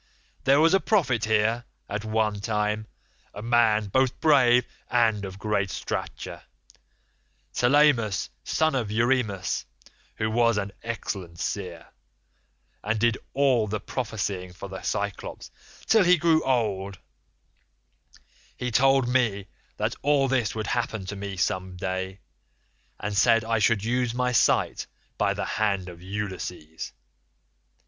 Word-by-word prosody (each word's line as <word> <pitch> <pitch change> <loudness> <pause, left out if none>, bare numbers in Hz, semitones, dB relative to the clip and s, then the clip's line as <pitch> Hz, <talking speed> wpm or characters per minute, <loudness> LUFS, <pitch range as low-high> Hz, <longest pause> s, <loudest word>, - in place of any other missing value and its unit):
There 135 +1 +5
was 165 +3 +5
a 195 - +6
prophet 145 - +1
here, 110 +2 +2 0.2
at 105 +1 -4
one 110 -1 0
time, 105 0 -1 0.5
a 105 - -7
man 115 -2 +3
both 130 +5 +1
brave 125 -6 +5 0.2
and 115 -4 +2
of 95 -1 -6
great 100 -1 0
stature, - - -5 1.1
Telemus 125 -6 +3
son 160 0 +1
of 120 -6 -1
Eurymus, 110 -4 0 0.5
who 110 0 -1
was 115 -1 +3
an 100 -1 -2
excellent 95 -7 -5
seer, 90 -5 -4 1.0
and 105 +2 0
did 115 -1 +2 0.2
all 130 -6 +3
the 105 +1 -2
prophesying 100 -6 -4
for 90 - -8
the 95 -1 -7
Cyclopes - - -4 0.3
till 220 -3 +5
he 180 0 +5
grew 160 -1 +3
old; 100 -7 0 1.6
he 125 0 -3
told 135 +1 +4
me 110 -6 +1 0.3
that - - 0
all 140 -1 +3
this 125 -6 0
would 110 -1 -3
happen 110 -3 -2
to 100 - -5
me 100 -1 -6
some 95 0 -1
day, 95 +1 -4 0.8
and 105 0 -3
said 115 +2 +4
I 115 0 +1
should 105 -1 +2
lose 120 0 0
my 125 0 +1
sight 120 - +2 0.3
by - - +2
the - - -2
hand 100 -4 -1
of 85 -1 -12
Ulysses. 95 -5 -5
110 Hz, 130 wpm, -26 LUFS, 100-125 Hz, 1.6 s, a